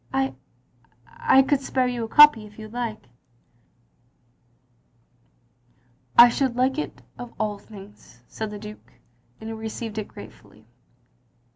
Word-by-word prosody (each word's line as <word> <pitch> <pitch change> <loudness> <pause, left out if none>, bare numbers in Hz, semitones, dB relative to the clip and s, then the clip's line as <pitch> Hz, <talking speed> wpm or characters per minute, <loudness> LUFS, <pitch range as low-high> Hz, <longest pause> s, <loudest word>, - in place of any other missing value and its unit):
I 135 0 -1 0.5
— 120 0 -36
I 265 - +3
could 275 0 0
spare 260 -1 0
you 245 -2 -2
a - - -4
copy 235 -4 +6
if 210 - -19
you 215 -1 -9
liked." 225 - -5 1.2
" 120 +1 -41 1.5
I 240 - +11
should 250 0 -1
like 260 +3 +1
it - - -6 0.2
of 245 -1 -9
all 210 -2 -2
things, 200 - -15
" - - -36
said 220 -1 -6
the 210 - -7
Duke, 210 0 -12 0.5
and 220 - -9
he 225 - -5
received 220 0 -6
it 210 - -5
gratefully. - - -15
220 Hz, 145 wpm, -24 LUFS, 205-245 Hz, 1.5 s, I